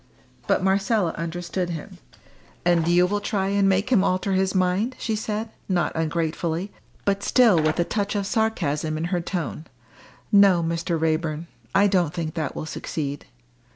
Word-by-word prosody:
But - - +2
Marcella 195 -1 +2
understood 175 +2 -3
him. 165 -3 -7 0.7
"And 170 -2 +3
you 175 +1 +5
will 205 +3 0
try 200 -2 -1
and 200 -1 +3
make 195 +6 +1
him 205 -7 +5
alter 185 +1 0
his 190 0 +1
mind?" 185 +7 +1
she 220 - -2
said, 215 +1 -3 0.2
not 180 -2 +1
ungratefully, 165 +3 -2 0.3
but 200 0 +1
still 220 -8 +4
with 155 +2 0
a - - +4
touch 205 +3 -2
of 200 -1 0
sarcasm 165 -9 0
in 160 - -3
her 175 - +1
tone. 170 -3 -4 0.7
"No, 200 -4 +6
Mr. 165 0 -1
Raeburn, 160 0 -1 0.3
I 200 - +6
don't 180 -6 +1
think 160 -2 -3
that 155 -5 -3
will - - -4
succeed." 145 -3 -5
180 Hz, 160 wpm, -24 LUFS, 165-200 Hz, 0.7 s, No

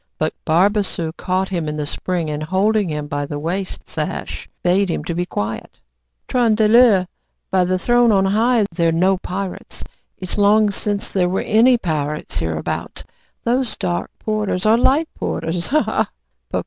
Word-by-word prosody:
But - - -1
Barbassou 180 -1 +1
caught 185 +2 -1
him 170 -5 -2
in 150 0 -3
the 150 - -2
spring, 175 +2 -2
and 150 0 -4
holding 195 +4 +1
him 150 -1 -3
by 145 0 -3
the 145 - -4
waist 180 +5 -4
sash, - - -4
bade 185 +2 +2
him 165 - -2
be 175 +2 -2
quiet. 105 -5 -5 0.5
"Tron 235 -3 +2
de 215 0 +3
ler! 220 -5 +6 0.5
by 185 -1 +3
the 185 +1 +1
throne 240 +4 +3
on 195 -2 +3
high! 220 +3 +3
they're 165 -1 +1
no 185 +4 +2
pirates. 185 0 -6 0.3
It's 185 +2 -4
long 210 +1 +4
since 205 0 -2
there 180 -2 +2
were 190 - 0
any 240 +4 +4
pirates 150 -6 -2
hereabout. 80 -1 -3 0.4
Those 245 0 0
dark 90 0 -2
porters 210 -3 -2
are 215 +1 +6
light 275 +7 +3
porters. 170 +1 -3
Ha, 305 +4 +3
ha!" 220 - 0
190 Hz, 160 wpm, -20 LUFS, 165-215 Hz, 0.5 s, ler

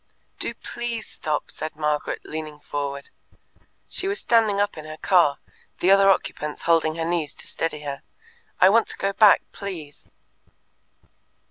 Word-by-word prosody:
"Do - - -3
PLEASE 235 -2 -5
stop!" 150 -1 -3
said 155 -1 -5
Margaret, 150 -1 -1
leaning 155 -1 -6
forward. 140 -1 -4 0.8
She 380 - 0
was 400 +1 -1
standing 220 -4 +3
up 205 0 +1
in 155 - -9
the 155 0 -8
car, 170 -7 +3 0.4
the 185 - +3
other 195 0 +6
occupants 150 -5 -1
holding 165 -2 +3
her 165 0 -2
knees 165 -3 -1
to - - -7
steady 160 -2 -2
her. 140 -2 -5 0.6
"I 185 - +8
want 225 +3 +4
to - - -2
go 195 0 -1
back, 210 0 +6
please." 170 -8 -8
165 Hz, 150 wpm, -24 LUFS, 150-200 Hz, 0.8 s, I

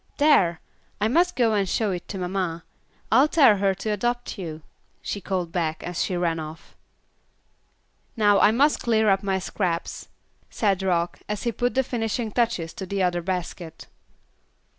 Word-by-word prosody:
There! 195 - +4 0.4
I 210 - +2
must 345 +9 +2
go 230 -3 +2
and 200 -3 +1
show 215 +1 0
it 180 -2 -5
to 195 - -6
mamma. 180 -2 -3 0.5
I'll 260 +7 +6
tell 275 -10 +5
her 195 -1 +1
to 200 +3 -5
adopt 240 +2 -2
you," 160 -4 -6 0.4
she 200 - -5
called 180 -3 -3
back, 160 -2 -2
as 175 -1 -3
she 180 - -2
ran 165 -2 0
off. 155 +1 -9 1.4
"Now 205 -2 +4
I - - +6
must 275 +7 +2
clear 220 -3 +3
up 195 0 +2
my 195 -1 0
scraps," 180 -2 -3 0.4
said 200 -4 0
Rock, 175 -2 0
as 210 -1 -3
he 235 - 0
put 245 +3 -1
the 265 - +3
finishing 225 -2 -2
touches 225 -9 0
to 190 - -7
the 195 0 -1
other 175 -1 +1
basket. 175 -2 -5
195 Hz, 165 wpm, -24 LUFS, 175-225 Hz, 1.4 s, I'll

